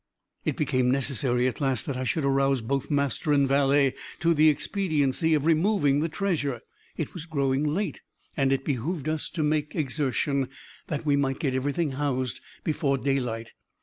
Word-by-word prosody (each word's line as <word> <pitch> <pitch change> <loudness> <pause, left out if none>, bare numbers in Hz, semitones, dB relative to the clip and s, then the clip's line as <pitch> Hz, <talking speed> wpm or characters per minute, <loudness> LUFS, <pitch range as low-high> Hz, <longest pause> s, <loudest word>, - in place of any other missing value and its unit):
It - - -1
became 130 -1 +1
necessary, 130 -2 +1
at 130 - -3
last, 135 -5 0
that 140 - -3
I 130 0 -3
should 140 +5 0
arouse 135 -1 +2
both 135 +4 -2
master 140 0 +1
and 140 -1 +4
valet 140 0 +3 0.3
to 170 0 +4
the 155 0 +6
expediency 155 -2 +1
of 150 -1 0
removing 160 -3 +3
the 160 +2 0
treasure. 150 - -1 0.4
It 160 - -3
was 165 -3 -7
growing 140 -3 0
late, 160 +3 -1 0.3
and 135 -1 +2
it 135 0 0
behooved 145 +3 -2
us 155 -1 -1
to 165 -3 -2
make 150 0 0
exertion, 140 -2 0 0.4
that 150 0 -3
we 145 -2 +3
might 135 -1 0
get 135 -4 -1
everything 145 +4 0
housed 130 -4 -2 0.2
before 145 -3 0
daylight. 125 -4 -2
140 Hz, 170 wpm, -27 LUFS, 135-155 Hz, 0.4 s, the